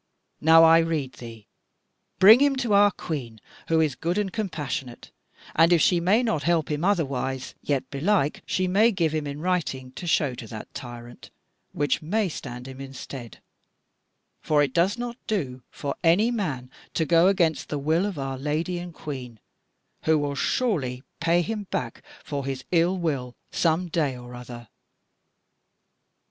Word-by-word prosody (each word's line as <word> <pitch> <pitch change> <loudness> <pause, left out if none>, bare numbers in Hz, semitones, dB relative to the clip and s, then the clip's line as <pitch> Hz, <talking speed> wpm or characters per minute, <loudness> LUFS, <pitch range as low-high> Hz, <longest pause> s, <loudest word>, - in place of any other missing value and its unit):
Now 160 +1 +7
I 165 0 +7
rede 160 -6 -1
thee 115 -3 -10 0.7
bring 210 +5 +9
him 285 0 +3
to 245 -5 0
our 205 0 +6
Queen, 130 - -6 0.3
who 165 0 +3
is 155 -4 +2
good 170 +7 -2
and 205 -3 -1
compassionate, 150 - -4 0.4
and 165 +2 +5
if 175 - +5
she 175 +3 +4
may 195 +8 +3
not 220 -11 0
help 165 -2 +1
him 150 +2 -2
otherwise, 135 -9 -1
yet 140 -3 -1
belike 150 +1 +1
she 185 0 0
may 210 +6 +4
give 170 -6 0
him 155 -2 -2
in 145 +1 -6
writing 155 -8 -2
to 175 +6 -8
show 150 -5 +2
to 120 -2 -8
that 110 0 -9
tyrant, 120 -2 -9 0.4
which 145 -1 0
may 200 +5 0
stand 125 -4 -7
him 135 0 -9
in 135 0 -9
stead: 125 -4 -9 1.0
for 150 -1 +3
it 135 -3 -2
does 190 +6 +2
not 240 0 -5
do 140 - -2
for 140 -1 -4
any 190 +8 +4
man 145 - -3 0.2
to 160 - +1
go 170 +2 +5
against 170 -7 +1
the 150 - -2
will 160 +7 +1
of 195 -6 -5
our 135 -1 -4
Lady 155 +5 -2
and 175 -2 -8
Queen; 125 -6 -7 0.7
who 160 0 +4
will 145 -1 -1
surely 140 - -1 0.2
pay 170 +1 +2
him 215 +1 -4
back 115 -3 -3 0.2
for 140 -2 -4
his 135 -2 -4
ill 175 +2 +3
will 140 -8 -2 0.2
some 170 +2 +1
day 150 -6 -1
or 125 0 -11
other." 120 -1 -9
155 Hz, 165 wpm, -25 LUFS, 135-180 Hz, 1.0 s, bring